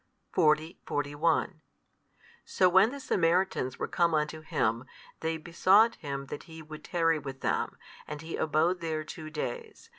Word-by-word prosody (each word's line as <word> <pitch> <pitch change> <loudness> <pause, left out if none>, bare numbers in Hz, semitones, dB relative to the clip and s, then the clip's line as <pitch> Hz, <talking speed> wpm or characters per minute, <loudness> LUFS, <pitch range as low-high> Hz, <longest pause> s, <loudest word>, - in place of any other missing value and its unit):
40, 155 +2 +2
41 155 +3 0 0.8
So 185 - +3
when 190 +4 +6
the 280 +3 -7
Samaritans 175 - +1
were - - -2
come 170 -2 +2
unto 155 +1 -1
Him, 115 -5 0 0.3
they 160 0 -1
besought 185 +7 +4
Him 140 -3 -5
that - - -6
He 160 0 -9
would 155 0 -10
tarry 165 -2 +1
with 135 -2 -8
them: - - -1 0.3
and 150 -1 -6
He 165 - -5
abode 160 +4 +1
there 160 -2 -2
two 155 0 -8
days. 455 - -6
160 Hz, 150 wpm, -29 LUFS, 150-175 Hz, 0.8 s, when